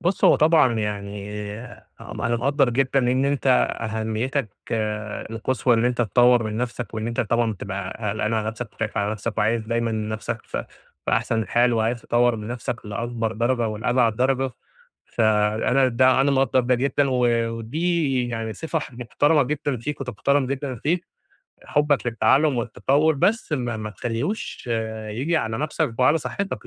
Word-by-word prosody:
بُصّ، 175 +1 0
هو - - +7
طبعًا 155 -6 +4
يعني 105 0 -4 0.5
أنا 120 0 -2
مقدر 135 +2 +2
جدًا 135 +2 +1
إن 130 +1 +2
أنت 140 0 -1 0.3
أهميتك 110 +3 -2 0.8
القصوى 120 +2 +1
إن 115 +1 +2
أنت 125 0 +1
تطور 120 +2 +4
من 110 -1 -3
نفسك، 120 0 -4
وإن 110 0 -3
أنت 115 0 -1
طبعًا 115 +1 +1
بتبقى 100 -1 -5 0.2
قلقان 110 +1 -1
على 110 -1 -1
نفسك 110 0 -6
وخايف 115 0 -4
على 100 0 0
نفسك 110 +1 -4
وعايز 110 +2 +2
دايمًا 115 0 0
نفسك 110 0 -3
في - - -4 0.4
في - - +1
أحسن 110 -2 +1
حال، 120 +1 +3
وعايز 115 +1 0
تطور 120 0 +2
من 105 0 -7
نفسك 120 -1 -5
لأكبر 115 +2 -3
درجة 120 +1 0
ولأبعد 115 +1 +1
درجة، 130 +1 +1 0.6
فأنا 110 +4 +2
ده 130 +2 +4
أنا 140 +1 +3
مقدر 130 -2 +2
جدًا 140 +2 +1
و 125 -1 +2 0.2
ودي 135 +3 -1
يعني 115 -1 -3
صفة 160 +5 -3 0.2
محترمة 145 +5 +2
جدًا 140 0 -2
فيك 140 +6 -5
وتُحترم 135 +2 0
جدًا 135 0 -3
فيك 170 +9 -1 0.6
حبك 145 -3 +1
للتعلم 135 +4 +3
والتطور، 135 +7 +1
بس 195 +6 +1
ما 120 -5 -2
ما 110 0 -5
تخليهوش 120 - -4 0.4
ييجي 135 +10 0
على 110 -5 -2
نفسك 150 -5 -1
وعلى 135 +5 +5
صحتك، 150 +8 -4
120 Hz, 155 wpm, -23 LUFS, 110-135 Hz, 0.8 s, هو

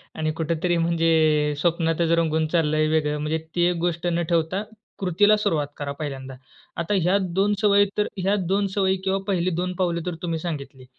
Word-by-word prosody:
आणि 155 0 -1
कुठेतरी 170 +2 0
म्हणजे 160 -3 +2
स्वप्नातच 165 -1 +1
रंगून 160 -1 +1
चालला 155 -2 +1
आहे 155 0 +3
वेगळं. 150 -1 +1
म्हणजे 150 +2 -1 0.2
ती 175 - +2
एक 180 - -1
गोष्ट 175 0 -1
न 170 0 0
ठेवता 170 +4 0 0.4
कृतीला 205 +3 +3
सुरुवात 160 -9 0
करा 145 -1 -4
पहिल्यांदा. 135 -3 -5 0.4
आता 170 +4 -1
ह्या 180 +4 +3
2 190 +3 +1
सवयी 205 -1 +5
तर 210 - +2
ह्या 195 +2 +1
2 195 +3 0
सवयी 190 -1 +2
किंवा 195 0 0
पहिली 185 -2 +1
2 180 0 -2
पावले 170 -2 0
तर 175 -2 -3
तुम्ही 165 -2 -2
सांगितली. 140 -6 -6
170 Hz, 180 wpm, -24 LUFS, 155-185 Hz, 0.4 s, सवयी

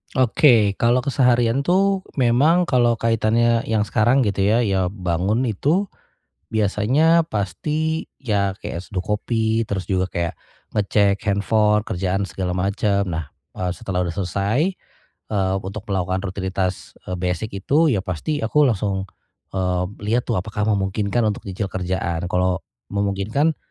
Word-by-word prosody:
Oke. 120 -5 +4
Kalau 120 +4 +3
keseharian 125 -1 +2
itu 190 +3 +2 0.2
memang 145 +9 +4
kalau 120 -4 +2
kaitannya 115 +1 +2
yang 110 -2 0
sekarang 120 +6 +3
gitu 100 -1 0
ya, 105 +4 +3
ya 95 -5 +1
bangun 95 +5 0
itu 150 - +1 0.6
biasanya 115 +11 +3
pasti 150 - -2
ya 100 -6 -1
kayak 85 - -5
seduh 95 -1 -5
kopi, 110 +1 0
terus 95 -2 -2
juga 95 -1 0
kayak 85 -2 -2 0.4
ngecek 100 -1 +2
handphone, 105 +1 +2
kerjaan 95 +2 -1
segala 95 -1 -4
macem. 100 +1 +1
Nah, 80 -4 -4 0.2
eee, 90 -1 -2
setelah 90 -2 -2
udah 85 -2 -2
selesai, 100 - 0 0.6
eee, 95 -2 +1
untuk 100 +3 -7
melakukan 95 -1 -1
rutinitas, 95 -1 -3 0.2
eee, 90 - -2
basic 90 +4 -3
itu 155 +3 +3
ya 100 -9 0
pasti 110 - -2
aku 145 +5 +3
langsung, 100 -3 -1 0.5
eee, 90 -1 0 0.3
lihat 120 +1 0
tuh - - +1
apakah 105 +3 -2
memungkinkan 100 +2 0
untuk 105 -1 -1
cicil 95 +1 -4
kerjaan. 90 -2 -2
Kalau 90 0 +1 0.3
memungkinkan, 100 +10 0
105 Hz, 135 wpm, -21 LUFS, 95-120 Hz, 0.6 s, Oke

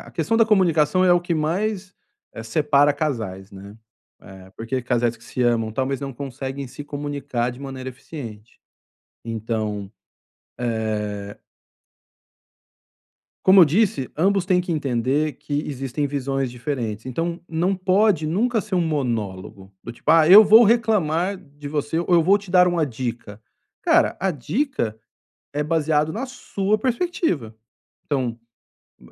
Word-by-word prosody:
a - - -13
questão 165 +8 0
da 225 - +5
comunicação 185 -4 +3
é 180 - +5
o 175 - +4
que 175 -1 -2
mais, 185 +5 -2 0.4
eh, 110 - -8
separa 145 +4 +3
casais, 110 -11 -4
né? 100 +2 -12 0.5
Eh, 95 -1 -13
porque 115 +3 -3
casais 120 -1 0
que 115 - -20
se 125 - -3
amam 115 -2 +1
talvez 135 +3 -2
não 140 -1 -5
conseguem 135 +1 -6
se 145 - -9
comunicar 140 -4 -3
de 125 +2 -11
maneira 135 -2 -6
eficiente. 120 -5 -10 0.6
Então, 110 -3 -3 0.7
eh 105 -3 -3 2.1
Como 190 +1 +8
eu 175 - +10
disse, 160 - +1
ambos 190 +3 +2
têm 185 -2 +3
que 180 -1 -2
entender 140 0 0
que 145 +3 -4
existem 135 +1 -3
visões 135 -2 -2
diferentes. 120 -4 -4
Então, 165 +7 -3
não 175 +4 0
pode 185 -3 +2
nunca 225 +8 +1
ser 210 -2 -3
um 180 - +3
monólogo. 110 - -3
Do 120 - -6
tipo: - - -2
"Ah, 160 -1 +6
eu 200 +5 +10
vou 220 +3 +7
reclamar 200 -5 +1
de 145 -2 -11
você 150 +2 -2
ou 170 - -2
eu 170 -2 +5
vou 195 +5 +4
te 200 -2 -12
dar 180 0 +6
uma 170 -4 +1
dica". 115 -4 -6 0.4
Cara, - - +3
a 190 - 0
dica 150 - -2 0.6
é 145 - -1
baseado 155 0 +1
na 245 +5 -3
sua 215 -5 -2
perspectiva, 240 - -1 0.5
então 125 -5 -2 0.6
m 60 - -19
145 Hz, 145 wpm, -22 LUFS, 120-180 Hz, 2.1 s, eu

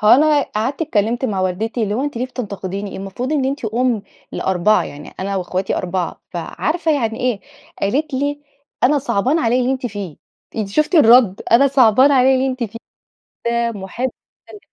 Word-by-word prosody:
هو 210 - +3
أنا 295 +3 +6
قعدت 260 +9 -2
اتكلّمت 235 0 0
مع 200 -6 -1
والدتي، 215 +6 -1
اللي 205 0 -1
هو 265 +5 -1
أنتِ 290 -5 -4
ليه 250 - -1
بتنتقديني؟ 200 -5 -5
المفروض 200 +9 -4
إن 280 -3 +1
أنتِ 275 -1 -2
أم 230 0 0 0.3
ل4، 190 +3 +2
يعني 145 +1 -10
أنا 195 +1 -2
واخواتي 185 +1 -2
4 180 -1 -3
فعارفة 310 - -1
يعني 230 -4 -1
إيه. 245 -5 0 0.4
قالت 275 +9 0
لي: 285 +2 -1 0.4
"أنا 290 +3 +4
صعبان 265 +2 0
عليّ 245 -2 +2
اللي 255 +2 +1
أنتِ 260 -1 -3
فيه." 200 -7 -6 0.4
أنتِ 210 -3 -2
شفتِ 305 - 0
الرد؟! 235 - +6
أنا 270 +4 +6
صعبان 260 +1 +5
عليّ 265 0 +5
اللي 260 +1 +1
أنتِ 255 -2 -2
فيه 230 +1 -8 1.0
من 195 - -8
واحدة 240 +7 -3 0.4
محبة 420 - -11
240 Hz, 175 wpm, -19 LUFS, 200-265 Hz, 1.0 s, أنا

